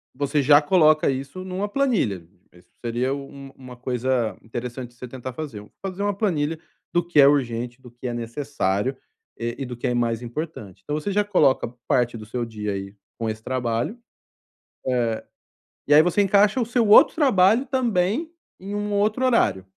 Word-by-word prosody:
você 145 +1 0
já 145 +2 +7
coloca 155 -1 +4
isso 135 +7 -4
numa 190 +2 -3
planilha. 205 - 0 0.3
Isso 90 - -21 0.2
seria 120 +3 0
u 140 -1 -6 0.3
uma 125 -1 -11
coisa 125 -2 -1
interessante 120 +2 -6
de 120 - -25
você 125 +1 -8
tentar 130 +1 -7
fazer. 120 -8 -7 0.2
Fazer 195 +1 -4
uma 205 - +1
planilha 165 -6 -1 0.3
do 175 -1 +2
que 175 -3 +2
é 140 - +8
urgente, 120 -3 0
do 125 - -13
que 120 +2 -7
é 120 - -3
necessário, 120 -1 -2 0.4
e 120 0 -3
e 135 - -3
do 125 -1 -7
que - - -2
é 125 - 0
mais 115 -1 0
importante. 120 - -7
Então 150 - -3
você 200 - -3
já 205 +1 +2
coloca 165 -10 +2 0.2
parte 120 -2 +2
do 110 - -9
seu 120 +3 -3
dia 105 -2 -4
aí 100 +1 -6 0.2
com 115 -1 -1
esse 110 0 -5
trabalho. 125 - -2 1.9
Eh, - - -3
e - - +9
aí 150 - +9
você 180 +4 +2
encaixa 200 +4 +4
o 230 - +1
seu 235 -2 +1
outro 215 +8 +7
trabalho 235 - +4
também 245 - 0 0.3
em 195 +2 -6
um 205 0 -2
outro 215 +5 +1
horário. 100 - +2
140 Hz, 180 wpm, -23 LUFS, 120-195 Hz, 1.9 s, e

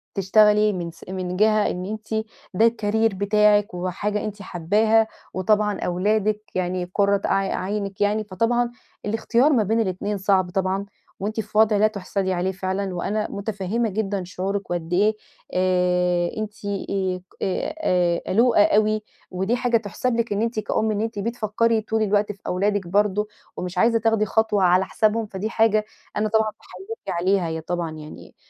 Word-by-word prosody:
تشتغلي 210 +2 +4
من 175 -2 -4
س 165 - -16
من 180 -1 -3
جهة 215 0 +3
إن 180 +1 -5
أنتِ 220 +1 -3 0.3
ده 220 +5 +5
الcareer 220 -1 0
بتاعكِ 205 +1 +3
وحاجة 185 +4 -2
أنتِ 210 -1 -6
حابّاها، 215 +5 +2 0.3
وطبعًا 210 +2 +1
أولادِك 210 +4 0
يعني 180 -1 -2
قرة 200 -1 +3
ع - - +2 0.3
عينِك 200 0 -3
يعني، 210 +1 +2
فطبعًا 230 +4 0 0.3
الاختيار 230 +6 +2
ما 230 -5 +3
بين 220 +3 +1
الاتنين 205 0 -1
صعب 190 -1 +2
طبعًا 190 +1 -1 0.3
وأنتِ 215 +3 -3
في 215 0 -4
وضع 215 -1 +5
لا 215 +1 +5
تُحسَدي 195 -2 -2
عليه 180 +1 0
فعلًا، 190 0 -3
وأنا 210 +4 -1
متفهمّة 205 +2 -2
جدًا 200 -1 -2
شعورِك 190 +2 -4
وقد 175 0 -3
إيه 210 +4 +3 0.4
آآ، 180 -1 +2
أنتِ 215 -1 -3 0.9
آآ، 180 - 0
قلوقة 230 0 +5
أوي، 215 +1 +2 0.3
ودي 190 +6 0
حاجة 245 -1 +2
تحسب 230 +3 -2
لِك 230 -2 0
إن 205 - -1
أنتِ 230 -1 -1
كأم 215 +1 0
إن 210 0 -1
أنتِ 225 -1 -3
بتفكري 230 0 0
طول 220 +1 -1
الوقت 205 0 +1
في 200 - -13
أولادِك 200 0 0
برضه 210 +2 +1 0.3
ومش 180 0 -5
عايزة 230 +4 +4
تاخدي 225 -1 +2
خطوة 215 -2 +1
على 180 +1 +4
حسابهم، 220 +2 +1
فدي 205 +1 -4
حاجة 220 -2 +2 0.3
أنا 215 +1 +1
طبعًا 220 0 +2
باحيِّيكِ 435 - -10 0.2
عليها 185 0 +2
هي 160 0 -3
طبعًا 170 0 -3
يعني، 155 -1 -11
205 Hz, 160 wpm, -23 LUFS, 185-220 Hz, 0.9 s, ده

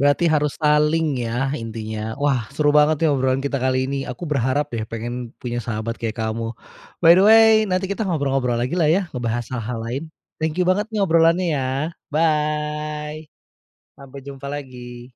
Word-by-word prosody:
berarti 145 +5 +3
harus 150 -3 +1
saling 150 -2 +2
ya, 120 +3 -1
intinya. 110 -1 -5
Wah, 135 -6 0
seru 145 0 +2
banget 150 +1 +4
nih, - - +5
obrolan 130 0 +1
kita 140 -1 -1
kali 130 0 +1
ini. 140 +1 -3
Aku 125 +7 -6
berharap 145 0 0
deh, 110 -2 -2
pengen 120 +1 -5
punya 120 -1 -4
sahabat 115 0 -4
kayak 115 -2 -3
kamu. 115 0 -3 0.5
By 165 - +10
the 185 - +5
way, 225 0 +8 0.2
nanti 185 +1 0
kita 205 0 -3
ngobrol-ngobrol 135 -7 0
lagi, 125 +3 -2
lah 170 -3 +2
ya, 180 +6 +3
ngebahas 120 -1 -2
hal-hal 115 -1 -3
lain, 125 +5 -3 0.4
thank 160 +1 -1
you 180 - +2
banget 195 +4 +1
nih, 220 -2 -3
obrolannya 165 +1 +3
ya. 135 -3 -1 0.4
Bye, 150 0 -1 0.7
sampai 140 0 -10
jumpa 140 0 -8
lagi. 125 -4 -8
140 Hz, 170 wpm, -21 LUFS, 120-155 Hz, 0.7 s, By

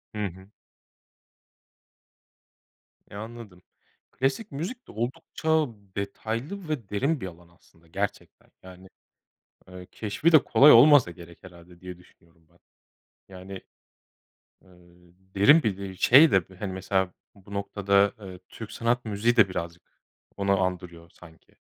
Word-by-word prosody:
Hı 105 -1 -2
hı. 95 +2 -10 2.6
E, - - -11
anladım. 110 -3 -10 0.5
Klasik 135 - -2
müzik 180 - -6
de - - -12
oldukça 150 +7 -2 0.3
detaylı 115 - -5
ve 120 -10 -4
derin 135 +8 -1
bir 95 - -4
alan 85 -1 -14
aslında 85 -1 -27
gerçekten. 100 +4 -6
Yani, 95 0 -14 0.8
eee, 90 0 -11
keşfi 115 +10 -1
de 155 - +6
kolay 150 +2 +6
olmasa 130 -3 +7
gerek 85 0 -14
herhâlde 85 -1 -16
diye 90 -1 -10
düşünüyorum 85 -2 -25
ben. 85 - -28 0.7
Yani, 95 +1 -11 1.1
eee, 95 - -24 0.7
derin 145 +12 +5
bir 100 -4 -1
de 100 -1 -8
şey 145 - +6
de 95 - +3 0.2
hani, 100 -3 -5
mesela, 95 0 -1 0.2
bu 100 0 -15
noktada, 100 0 +1
eee, 95 -3 -10
Türk 110 -2 -10
sanat 120 +1 -1
müziği 110 +3 0
de 105 -5 +5
birazcık 85 -1 -6 0.5
onu 100 0 +1
andırıyor 90 -2 -5
sanki. 80 -2 -19
100 Hz, 125 wpm, -26 LUFS, 90-120 Hz, 2.6 s, olmasa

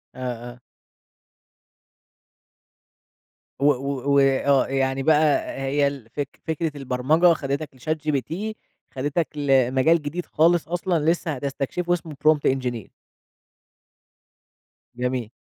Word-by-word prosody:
آه - - -11 0.3
آه. 120 - -15 3.0
و 140 - 0
و 140 0 +1
وآه 135 0 +3
يعني 135 0 0
بقى 155 0 +3
هي 140 +1 +1
ال 135 -5 -6
فك 140 +2 -6
فكرة 160 -1 -2
البرمجة 140 +6 +3
خدتك 140 0 -3
لchatgpt، 155 - -2 0.4
خدتك 145 +5 -1
لمجال 135 +3 +3
جديد 155 +4 -4
خالص 165 +1 +2
أصلًا 175 -2 -1
لسه 170 -2 -2
هتستكشفه 140 +6 -2
اسمه 165 -3 -4
prompt 155 -3 +4
engineer. 125 -5 -4 2.1
جميل. 125 -2 -2
140 Hz, 95 wpm, -23 LUFS, 135-160 Hz, 3.0 s, prompt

